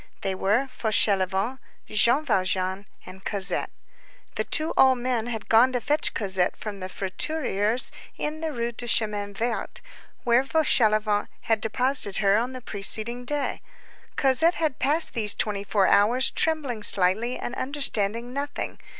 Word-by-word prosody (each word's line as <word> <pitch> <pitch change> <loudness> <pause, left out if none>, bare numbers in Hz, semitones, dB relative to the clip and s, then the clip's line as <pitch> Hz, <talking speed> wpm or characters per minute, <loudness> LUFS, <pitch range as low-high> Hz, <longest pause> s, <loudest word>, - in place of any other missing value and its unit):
They 195 - -2
were 205 +7 +1
Fauchelevent, 205 -1 0 0.3
Jean 235 +8 +2
Valjean, 185 - -1 0.2
and 190 +1 -12
Cosette. 195 -1 -1 0.6
The - - -1
two 310 0 +1
old 260 -1 +5
men 240 -2 -2
had 225 -3 -5
gone 235 +3 +5
to 250 - 0
fetch 295 +6 0
Cosette 190 -4 0
from 205 -2 -7
the 185 0 -6
fruiterer's 210 +2 0 0.3
in 305 +1 -4
the 320 -1 -2
Rue 235 -3 -3
du 240 +1 -6
Chemin 210 -3 0
Vert, 235 +3 -3 0.4
where 240 +2 +3
Fauchelevent 215 -8 +2
had 225 -2 0
deposited 235 -2 -1
her 200 -1 +3
on 240 +4 -1
the 255 - -8
preceding 225 +3 -1
day. 290 +2 -2 0.5
Cosette 280 +6 +3
had 310 -6 -2
passed 300 +5 +2
these 210 -4 0
twenty 205 -2 -2
four 200 -1 +1
hours 235 +8 +3
trembling 290 -9 0
silently 210 +6 +3
and 240 - -5
understanding 245 -4 -1
nothing. 285 +1 -4
230 Hz, 145 wpm, -25 LUFS, 205-260 Hz, 0.6 s, old